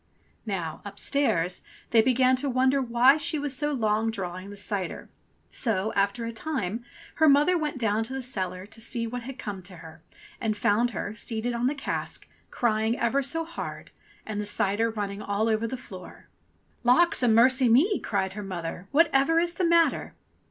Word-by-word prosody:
Now, 170 -6 -3
upstairs, 200 - -1 0.3
they 230 - +6
began 255 +2 +3
to 280 +2 -2
wonder 260 +2 +2
why 250 +3 +5
she 310 +1 0
was 285 -2 -2
so 295 +3 -1
long 220 -4 +1
drawing 185 -2 -5
the 205 - -9
cider; 195 -3 -4 0.4
so 220 -3 -1
after 200 +4 0
a 230 - -3
time 230 - -3 0.3
her 315 0 +5
mother 290 +6 +5
went 305 -4 -2
down 220 -2 +1
to 260 - -7
the 265 -1 -4
cellar 185 -6 -3
to 220 +2 -13
see 230 0 -2
what 245 +2 -5
had 260 +2 -8
come 205 -6 -6
to 180 +1 -11
her 160 -1 -12 0.4
and 215 -3 -1
found 225 +4 +2
her, 205 -3 -4
seated 225 +2 -2
on 235 +1 0
the 285 - 0
cask, 275 - -3 0.2
crying 220 -1 0
ever 235 +4 +1
so 325 +5 -1
hard, 335 +1 -7 0.3
and 210 -1 -3
the 205 - -4
cider 205 +2 +1
running 205 -2 -4
all 205 +2 -1
over 220 0 +1
the 260 - -4
floor. 185 -7 -12 0.5
"Lawks 265 +8 +4
a 245 - +3
mercy 250 +3 +5
me!'* 320 - +4
cried 190 -2 -2
her 210 - -6
mother, 180 -1 -6 0.2
"whatever 275 +5 +3
is 340 +1 +2
the 365 0 0
matter 335 -1 +2
230 Hz, 180 wpm, -27 LUFS, 205-265 Hz, 0.5 s, they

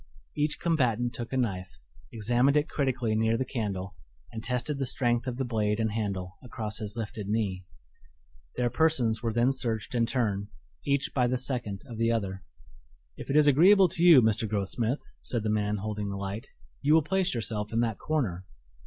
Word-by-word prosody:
Each 150 0 -1
combatant 125 -7 +1
took 120 -2 -6
a 130 - -1
knife, 90 - -2 0.3
examined 120 +6 +2
it 150 +1 +2
critically 130 -7 -1
near 110 +1 +2
the 130 - -1
candle 100 -7 -3 0.4
and 110 - -6
tested 125 +4 -1
the 135 - 0
strength 120 0 0
of 125 -1 -3
the 135 - -1
blade 105 -2 0
and 110 -1 0
handle 100 -4 -3
across 110 -3 -4
his 105 -1 -5
lifted 110 -3 -5
knee. 100 -4 -1 0.9
Their 120 -1 0
persons 120 -5 +2
were 115 - -1
then 120 +3 +3
searched 115 -5 -2
in 115 -1 +2
turn, 105 -6 -1 0.4
each 140 -1 0
by 125 -2 +2
the 130 +1 0
second 120 -6 -3
of 115 -4 -9
the 115 0 +2
other. 95 -4 -2 0.7
"If - - -9
it 135 - 0
is 150 -1 +6
agreeable 180 +7 +6
to 165 - -1
you, 165 -8 +8
Mr. 110 0 +1
Grossmith," 110 +6 -1 0.2
said 120 -3 -2
the 110 - 0
man 105 0 0
holding 105 0 -3
the 100 - -4
light, 100 +3 -5 0.3
"you 150 +2 +4
will 160 - +4
place 190 +1 0
yourself 105 -1 -2
in 115 +1 +1
that 115 -4 -1
corner." 105 - -2
115 Hz, 190 wpm, -28 LUFS, 105-130 Hz, 0.9 s, you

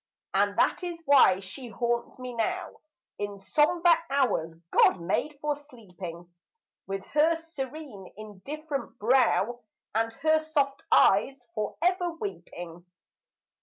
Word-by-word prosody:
And - - +2
that - - +2
is 345 -2 -4
why 260 -10 +6
she 245 +7 -8
haunts 235 +2 -2
me 255 -1 -7
now 360 +11 -2 0.5
In 205 -1 -4
sombre 330 - +3
hours 250 - +1 0.2
God - - +5
made 285 - -1
for 300 0 -1
sleeping, 185 - -10 0.6
With 195 0 -4
her 310 +3 +4
serene, 295 - -8
indifferent 270 +7 -6
brow, 240 -1 +2 0.3
And 225 +1 +1
her 315 +6 +2
soft 290 -3 -1
eyes 245 +6 +4
for 215 -2 -3
ever 355 -1 +1
weeping. 175 - -7
255 Hz, 120 wpm, -28 LUFS, 200-305 Hz, 0.6 s, why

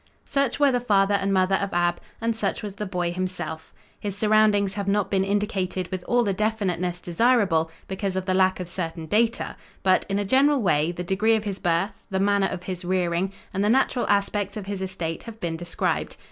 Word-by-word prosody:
Such 275 -2 0
were 285 -2 +5
the 245 - +1
father 205 -4 +3
and 195 0 +1
mother 190 0 +3
of 200 0 -3
Ab, 175 0 +1 0.2
and 230 0 0
such 210 -2 -2
was 205 -2 -5
the 210 - -3
boy 180 -2 -1
himself. 175 -3 -4 0.3
His 200 -1 -4
surroundings 210 -2 +3
have 200 -1 -4
not 200 0 +1
been 190 -1 +2
indicated 195 -3 -1
with 185 -1 -3
all 245 0 +3
the 200 -3 0
definiteness 185 -4 -1
desirable, 180 -3 +2 0.2
because 190 0 -3
of 190 0 -2
the 185 - +1
lack 185 0 +3
of 180 - -4
certain 165 -2 -4
data, 225 +7 +1 0.3
but, 185 -1 +3
in 195 - 0
a 205 - 0
general 275 +6 +4
way, 155 -2 +2
the 175 0 -5
degree 205 +5 +2
of 215 - -1
his 200 -2 -4
birth, 175 +4 -1
the 190 -2 -1
manner 200 0 +3
of 180 - -5
his 185 -1 -5
rearing 180 0 0 0.2
and 195 +1 0
the 210 - +2
natural 255 0 +2
aspects 200 0 0
of 205 - -5
his 200 -1 -4
estate 175 -4 -3
have 225 -1 -10
been 170 -5 -2
described. 170 +1 -2
195 Hz, 210 wpm, -25 LUFS, 180-210 Hz, 0.3 s, were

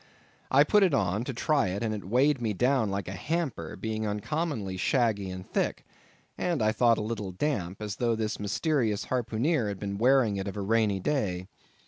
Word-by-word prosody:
I 140 +2 +6
put 210 +7 +4
it 180 -7 +4
on, 100 -1 0
to 135 - -3
try 145 -2 +2
it, 95 +4 -3
and 110 -1 0
it 105 - -5
weighed 130 +6 +2
me 110 -3 0
down 125 +1 +2
like 100 -1 -3
a - - -4
hamper, 130 - -3
being 110 +2 -3
uncommonly 105 - -2
shaggy 105 -1 +1
and 95 0 -7
thick, - - -1 0.5
and 175 -3 0
I 110 - +3
thought 115 0 +3
a - - -2
little 105 -3 -4
damp, 100 - -2
as 105 +1 -4
though 115 -2 +1
this 110 -1 -2
mysterious 110 - 0
harpooneer 125 +2 0
had 100 -2 -4
been 100 -1 -4
wearing 120 -4 +4
it 95 +1 -3
of 100 - -5
a - - -2
rainy 105 -1 +2
day. 95 -7 -1
110 Hz, 195 wpm, -28 LUFS, 100-130 Hz, 0.5 s, I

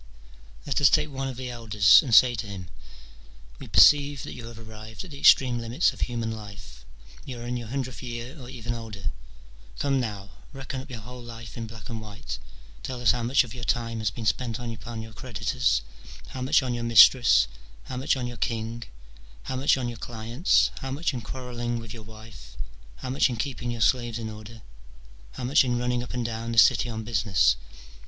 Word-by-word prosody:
Let - - 0
us - - +7
take 150 0 +2
one 135 0 -3
of 130 -2 -6
the 125 -1 -5
elders, 110 -3 +5
and 135 -6 -5
say 125 +1 +7
to 110 -2 -4
him, 95 -3 -8 0.5
" - - -22
We - - -9
perceive 145 -2 +5
that - - -7
you 115 -2 -8
have 115 -1 -10
arrived 110 -1 -9
at 175 - -12
the 140 - -9
extreme 125 -4 +5
limits 115 +8 +1
of - - -12
human 115 -2 -2
life: 100 - -10 0.4
you 125 -3 -7
are 120 - -7
in 120 0 -3
your 120 -2 -5
hundredth 130 +1 -4
year, 120 +2 -6
or 125 - -9
even 120 -2 -4
older. 110 -7 -5 0.7
Come 140 -1 +1
now, 100 -5 -4 0.2
reckon 135 0 -5
up 140 - -14
your 120 -4 -7
whole 125 +3 -10
life 115 -1 -10
in 115 -1 -5
black 110 -1 -11
and 115 -1 -5
white: 105 - -7 0.4
tell 130 -2 -5
us 120 -4 +4
how 120 +1 -2
much 125 +4 +3
of 120 - -10
your 120 - -8
time 115 -1 -1
has 110 -1 0
been 110 +2 -7
spent 115 +1 0
upon 115 -1 -6
your 110 0 -11
creditors, 115 - -1 0.5
how 130 - -7
much 130 +2 +3
on 125 -1 -2
your 120 -1 -3
mistress, 115 - +7 0.4
how 130 - -7
much 135 +1 +1
on 125 - -3
your 120 -1 -6
king, 115 +1 -3 0.6
how 130 - -4
much 135 +1 +3
on 125 -2 -2
your 120 -2 -6
clients, 115 - +1
how 135 - -5
much 150 +4 -1
in 125 - -4
quarrelling 120 0 -4
with 115 -2 -8
your 115 - -9
wife, 110 - -13 0.4
how 125 - -6
much 135 +1 +3
in 125 - -3
keeping 120 +1 -3
your 120 -1 -4
slaves 120 +1 +2
in 110 -1 -5
order, 110 +1 -11 0.7
how - - -7
much 135 +4 +4
in 120 -2 0
running 125 0 0
up 120 - -7
and 120 -1 -2
down 115 0 -4
the - - -5
city 120 +3 +6
on 110 -1 -4
business. 100 - +2
115 Hz, 210 wpm, -26 LUFS, 110-125 Hz, 0.7 s, us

